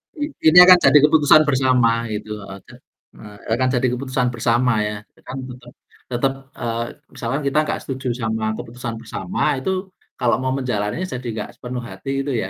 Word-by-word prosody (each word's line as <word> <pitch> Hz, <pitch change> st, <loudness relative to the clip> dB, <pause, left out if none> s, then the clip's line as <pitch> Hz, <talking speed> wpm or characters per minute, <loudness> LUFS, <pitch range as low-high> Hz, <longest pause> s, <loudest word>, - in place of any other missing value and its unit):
I 295 Hz, -, -4 dB, 0.2 s
ini 165 Hz, +3 st, +6 dB
akan 180 Hz, 0 st, +9 dB
jadi 150 Hz, -, +7 dB
keputusan 150 Hz, 0 st, +6 dB
bersama 125 Hz, -4 st, +2 dB
gitu, 105 Hz, +1 st, -6 dB
heeh, 100 Hz, 0 st, -10 dB
te -, -, -15 dB, 0.4 s
eh, 105 Hz, -1 st, -12 dB, 0.2 s
akan 130 Hz, 0 st, +1 dB
jadi 125 Hz, +1 st, +2 dB
keputusan 130 Hz, 0 st, -1 dB
bersama 120 Hz, +1 st, +1 dB, 0.2 s
ya, 105 Hz, 0 st, -4 dB
eee, -, -, -29 dB
kan 130 Hz, -, -6 dB
tetep 120 Hz, 0 st, -12 dB, 0.3 s
tetep, 130 Hz, +2 st, 0 dB, 0.2 s
eee, 115 Hz, -1 st, -3 dB, 0.3 s
misalkan 130 Hz, +5 st, -3 dB
kita 140 Hz, -, 0 dB
gak -, -, -2 dB
setuju 130 Hz, -1 st, -5 dB
sama 110 Hz, 0 st, -2 dB
keputusan 120 Hz, -1 st, -6 dB
bersama 185 Hz, -, -5 dB, 0.2 s
itu, 190 Hz, +5 st, -3 dB, 0.3 s
kalau 120 Hz, -1 st, +2 dB
mau 130 Hz, 0 st, -1 dB
menjalaninya 125 Hz, -, -2 dB
jadi 125 Hz, -1 st, -5 dB
gak -, -, -7 dB
sepenuh 125 Hz, 0 st, -5 dB
hati 95 Hz, +4 st, -7 dB
itu 140 Hz, -, -3 dB
ya, 95 Hz, -, -5 dB
125 Hz, 180 wpm, -20 LUFS, 115-135 Hz, 0.4 s, akan